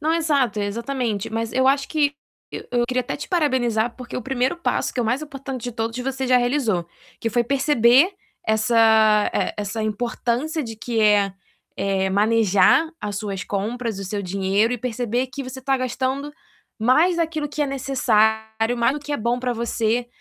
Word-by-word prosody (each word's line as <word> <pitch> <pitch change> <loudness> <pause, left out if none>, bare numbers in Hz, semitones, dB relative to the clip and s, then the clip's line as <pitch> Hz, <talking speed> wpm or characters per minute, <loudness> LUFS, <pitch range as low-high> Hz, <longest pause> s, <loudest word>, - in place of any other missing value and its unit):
Não, 315 +2 +1
exato, 280 -10 +1
exatamente, 230 0 -2
mas 225 0 -3
eu 260 +1 +2
acho 275 +1 +2
que 290 -2 +1 0.6
eu 240 -1 +2
queria 255 0 0
até 245 - -4
te - - -7
parabenizar, 245 - +1
porque 250 -2 -7
o 250 - -4
primeiro 260 +5 0
passo 340 - -1
que 250 - -2
é - - +1
o 225 - -2
mais 255 +6 0
importante 275 -4 -7
de 245 - -4
todos 225 0 -3
você 265 +1 -3
já 255 - +5
realizou, 245 - +1 0.3
que 230 - -2
foi 240 +2 +2
perceber 270 - +4 0.3
essa, 220 -1 +4
eh, - - -1
essa 210 +2 -3
importância 240 - -2
de 225 -3 -7
que, 225 0 -2
eh-eh, 195 -1 0
manejar 215 - +3
as 205 -1 -4
suas 195 -3 -4
compras, 220 +1 -3
o 195 - -5
seu 200 +2 -3
dinheiro 195 +5 +1
e 245 - -2
perceber 245 +1 -2
que 275 +2 -6
você 260 +1 -8
está 270 +1 +1
gastando 260 +3 -2 0.5
mais 305 +10 +3
daquilo 320 -3 -1
que 295 +1 -2
é 290 - 0
necessário, 225 -4 +1
mais 235 +2 +2
do 295 - -5
que 295 +1 -6
é 290 - +1
bom 235 +3 0
para 250 0 -1
você 235 +1 -1
240 Hz, 180 wpm, -22 LUFS, 220-270 Hz, 0.6 s, já